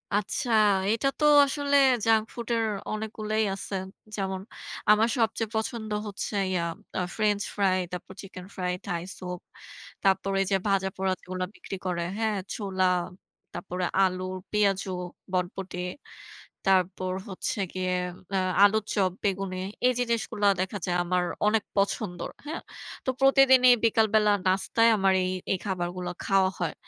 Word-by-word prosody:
আচ্ছা, 210 +4 -1 0.4
এইটা 225 +5 +1
তো 300 - +3 0.2
আসলে 285 0 0 0.3
junk 220 -1 +4
food 235 -1 -6
এর 225 -1 +1 0.3
অনেকগুলাই 215 0 -2
আছে। 195 +1 -5 0.4
যেমন, 190 -2 -3 0.5
আমার 215 +2 +5
সবচেয়ে 225 -1 0
পছন্দ 220 0 -2 0.2
হচ্ছে 205 +1 -4 0.2
ইয়া 180 -2 0 0.4
আ - - +1
ফ্রেঞ্চ 210 -2 +1
ফ্রাই, 195 -2 +2
তারপর 180 +1 -7
চিকেন 185 -2 -10
ফ্রাই, 180 -1 -1
থাই 175 -3 -2 0.2
সুপ। 180 -1 -6 0.6
তারপর 195 0 +2
এইযে 195 0 +1
ভাজা-পোড়া 190 -1 0
যেগুলা 185 0 -4
বিক্রি - - -7
করে, 180 -2 -1 0.2
হ্যাঁ? 220 -2 0 0.2
ছোলা, 190 -3 -1 0.7
তারপরে 180 -1 -3 0.2
আলু, 185 -1 0 0.3
পেয়াজু, 200 -2 +1 0.4
বটবটি। 180 0 -2 0.9
তারপর 185 -1 +2 0.2
হচ্ছে 200 +3 -3
গিয়ে 185 0 -1 0.4
ম্যা 195 - +1 0.3
আলুর 210 +1 +5
চপ, 190 -3 +2
বেগুনি 195 -2 -1 0.3
এইযে 245 -1 +2
জিনিসগুলা 220 -2 0
দেখা 190 +2 -2
যায় 175 -2 0
আমার 180 0 +1 0.2
অনেক 215 0 +2
পছন্দর, 195 -2 -1 0.2
হ্যাঁ? 320 +3 -4 0.4
তো - - 0
প্রতিদিনই 260 -2 +7
বিকালবেলা 220 -1 +4 0.2
নাস্তায় 195 +5 +3
আমার 195 -1 +3
এই 185 - -1 0.2
এই - - 0
খাবারগুলা 180 -1 -3
খাওয়া 195 -1 +3
হয়। 175 - -1
195 Hz, 135 wpm, -27 LUFS, 185-220 Hz, 0.9 s, প্রতিদিনই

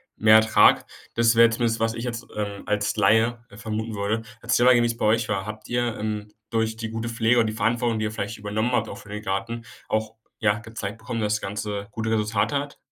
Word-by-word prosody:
mehr 110 0 +6
Ertrag. 110 0 +5 0.3
Das 115 0 +3
wäre 115 0 +7
zumindest, 115 -1 0
was 115 0 +1
ich 115 +1 -5
jetzt, 120 -1 -4
ähm, 100 -1 -4
als 105 -1 0
Laie, 115 +3 +3
äh, 100 - -14
vermuten 110 0 -4
würde. 105 +3 -1 0.2
Erzähle 120 +1 +3
mal - - +8
gern, 120 -1 +4
wie's 115 0 -1
bei - - -1
euch 115 +1 +2
war. 100 -2 -1
Habt 110 0 -8
ihr, 120 -2 0
ähm, 105 -1 -3 0.2
durch 110 -1 0
die 110 -1 -4
gute 115 +1 -4
Pflege 115 +1 +2
und 115 - +4
die 110 - -2
Verantwortung, 115 +1 0
die 110 - -1
ihr 110 - -2
vielleicht 105 0 -5
übernommen 105 +3 -1
habt 125 - 0
auch 100 - -7
für 105 - -14
den 105 0 -5
Garten, 115 +4 -3 0.2
auch, 110 0 -2 0.2
ja, 105 -1 +2
gezeigt 110 -2 -6
bekommen, 115 0 -4
dass 105 0 +1
das 105 - -3
ganze 100 0 -4
gute 110 +1 -3
Resultate 110 +4 0
hat? 145 0 -5
110 Hz, 230 wpm, -24 LUFS, 105-115 Hz, 0.3 s, mal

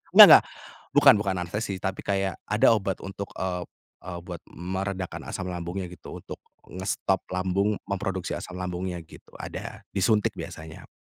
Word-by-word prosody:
Enggak - - +14
enggak, - - +10 0.5
bukan - - +7
bukan 95 -2 -1
anestesi 95 +2 -3
tapi 95 +1 -3
kayak 95 -1 0 0.2
ada 105 +2 +5
obat 95 -3 -1
untuk, 95 +1 -7
eee 90 -1 -2 0.4
eee, 90 -1 -6
buat 85 -2 -7
meredakan 95 +1 -4
asam 95 - -4
lambungnya 90 +1 -4
gitu, 90 0 -9
untuk - - -9 0.3
ngestop 95 +1 -1
lambung 95 +3 0
memproduksi 95 -2 -2
asam 90 -1 -7
lambungnya 90 0 -3
gitu - - -16
ada, - - -7
disuntik 105 +2 +2
biasanya. 80 0 -9
95 Hz, 145 wpm, -26 LUFS, 90-100 Hz, 0.5 s, Enggak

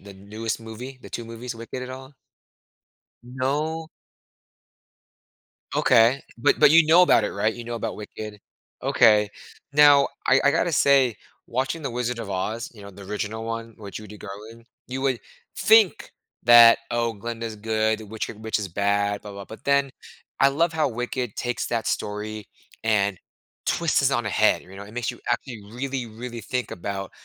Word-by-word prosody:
the 100 0 -12
newest 105 +3 -5
movie, 120 +4 -9
the - - -11
2 115 - -5
movies, 115 +1 -7
Wicked, 115 +2 -7
at 125 - -6
all? 130 +2 -10 1.1
No. 145 +6 -2 1.9
Okay. 120 +3 +4 0.2
But 120 - +2
but - - +8
you 165 0 +6
know 170 +3 +7
about 115 -11 +5
it, - - -2
right? 110 +2 0
You 120 - -8
know 120 0 -5
about 115 - -4
Wicked. 105 0 -8 0.4
Okay. 105 -3 +4 0.4
Now 145 -1 +7 0.2
I 130 +1 +5
I 140 - +6
gotta 170 +3 +1
say, 135 -5 +4 0.3
watching 135 +7 -2
the 140 - -3
Wizard 120 0 -2
of 110 -3 -6
Oz, 110 +5 -3
you 105 - -14
know, 100 - -10
the 100 +1 -13
original 105 +3 -4
one, 115 0 -5
with 100 -2 -10
Judy 105 -1 -8
Garland, 105 +4 -10 0.2
you 130 +1 -5
would 135 -3 +1 0.4
think 220 -4 +4 0.3
that, 120 0 +9
"Oh, 115 -1 0
Glinda's 115 +1 -5
good, 110 0 0
witch, 110 +1 -4
er, - - -8
witch 110 +1 -2
is 100 -2 -4
bad, 100 +2 0
blah 105 - -9
blah 100 0 -8
blah," 110 - -10
but - - -29
then 140 -1 +2 0.5
I 135 - +7
love 165 +4 +1
how 155 -2 +1
Wicked 125 -1 -3
takes 120 0 -2
that 115 -2 -2
story 105 0 -3 0.4
and 100 -4 +1 0.5
twists - - +2
it - - +3
on - - 0
a - - -1
head, - - +3
you 95 +1 -14
know? 100 - -8
It 105 - -13
makes 120 -1 -1
you - - -12
actually 120 -6 -3
really, 130 0 -3
really 115 +2 -7
think 125 -1 -3
about 95 +2 -5
115 Hz, 180 wpm, -24 LUFS, 105-130 Hz, 1.9 s, that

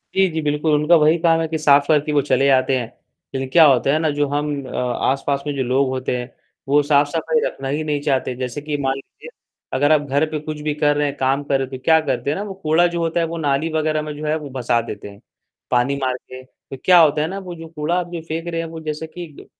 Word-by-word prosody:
जी, 190 0 +4
जी, 160 -1 -3
बिल्कुल, 150 +1 0
उनका 150 +4 +4
वही 155 +2 +4
काम 165 -1 +4
है 160 - -1
कि 160 0 -2
साफ 145 -2 +4
करके 150 -1 +2
वो 145 - +3
चले 140 - +3
आते 130 0 +3
हैं, 120 - -2 0.5
लेकिन 135 -1 -3
क्या 170 - +8
होता 135 -1 +4
है - - +3
ना 160 -1 +1
जो 145 0 0
हम 145 +1 -1 0.2
अ, - - -9
आसपास 135 +3 -1
में 145 - -1
जो 135 - -1
लोग 130 +2 +1
होते 130 -1 -2
हैं, 125 +1 -6 0.4
वो 145 +2 +4
साफ-सफाई 150 - +2
रखना 135 - -4
ही 150 +3 -2
नहीं 145 -2 -2
चाहते, 135 -3 -1
जैसे 125 +2 -4
कि 150 0 -3
मान 135 -1 0
लीजिए, 135 - -12 0.4
अगर 145 +3 +2
आप 155 -2 +5
घर 145 +1 0
पे 155 - -2
कुछ 155 0 -6
भी 150 0 -1
कर 145 0 +2
रहे 145 0 +1
हैं, 140 - -4
काम 135 +2 0
कर 140 -1 +1
रहे 135 - -1
हैं, 130 - -7
तो 130 - -21
क्या 160 -1 +6
करते 140 -1 -2
हैं 150 - -1
ना 200 - -3
वो 205 -2 -6
कूड़ा 160 +3 +4
जो 170 0 -3
होता 165 +1 0
है 165 - +1
वो 170 +1 -5
नाली 150 +1 0
वगैरह 155 -1 0
में 150 0 -5
जो 155 - -6
है 150 +1 +1
वो 150 -3 -8
भसा 120 -1 +1
देते 105 - -7
हैं, 100 0 -15 0.5
पानी 125 +3 +2
मार 130 -1 +1
के, 130 0 -12
तो 130 +1 -13
क्या 180 -1 +7
होता 150 -2 +4
है 155 - 0
ना 195 +3 -5
वो 180 -2 -8
जो 165 0 -10
कूड़ा 160 +1 -2
आप 175 -1 -6 0.2
फेंक 165 +1 -4
जो 170 - -4
रहे 165 0 -2
हैं 165 - -5
वो 165 0 -8
जैसे 155 +1 -4
कि 175 +2 -8
ड - - -13
150 Hz, 280 wpm, -20 LUFS, 135-160 Hz, 0.5 s, क्या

